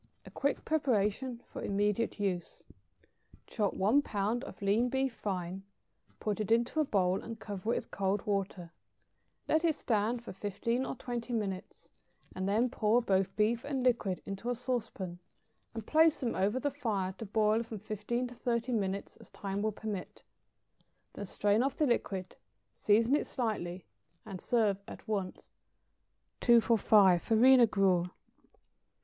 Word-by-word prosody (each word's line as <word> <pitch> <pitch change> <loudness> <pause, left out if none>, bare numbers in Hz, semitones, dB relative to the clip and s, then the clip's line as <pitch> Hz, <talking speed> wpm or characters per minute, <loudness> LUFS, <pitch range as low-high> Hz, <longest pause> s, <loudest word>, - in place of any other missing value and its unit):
= - - -44
(A - - -11
quick 280 0 -1
preparation 245 -4 0
for - - -8
immediate 205 +3 0
use.) 185 -4 -3 0.8
Chop 210 -4 -1
one 220 +9 +3
pound 220 0 -1
of - - -10
lean 210 +5 +2
beef 265 0 0
fine, 190 -3 -4 0.6
put 210 0 -2
it 215 - -2
into 235 +6 +2
a - - +5
bowl, 190 -7 +1
and 230 -1 -8
cover 205 0 -4
it - - +1
with - - -5
cold 195 +1 -1
water; 195 -4 -2 0.8
let 315 +1 +2
it 325 -3 +2
stand 230 -1 0
for - - -8
fifteen 205 +6 -2
or - - -4
twenty 245 -1 -5
minutes, 195 -5 -4 0.4
and 190 +1 -2
then 225 +5 +3
pour 230 -2 +2
both 195 -4 0
beef 225 +3 +1
and 275 -3 -2
liquid 230 -7 +1
into 195 +5 -5
a 245 - 0
sauce 245 -2 -2
pan, 175 -2 -7 0.6
and 225 -2 -5
place 315 +2 +4
them 245 -4 -1
over 205 +6 +1
the 285 +2 -1
fire 210 -9 -2
to 225 - -5
boil 215 +2 +2
from 230 -1 -6
fifteen 215 +4 -3
to 245 - -10
thirty 235 0 -1
minutes 200 -3 -2
as - - -16
time 195 0 -4
will 215 +1 0
permit; 205 -2 -6 0.9
then 205 - -6
strain 205 +4 +2
off 270 +2 0
the 305 - +3
liquid, 195 -7 -1 0.4
season 225 +6 +3
it - - -1
slightly, 190 -7 -3 0.4
and 195 -4 -7
serve 215 -5 +2
it 200 - -11
at - - -14
once. 200 -4 -4 0.9
245. 215 -6 +5
=Farina 240 +2 +6
Gruel. 185 -4 +2
215 Hz, 160 wpm, -32 LUFS, 195-240 Hz, 0.9 s, =Farina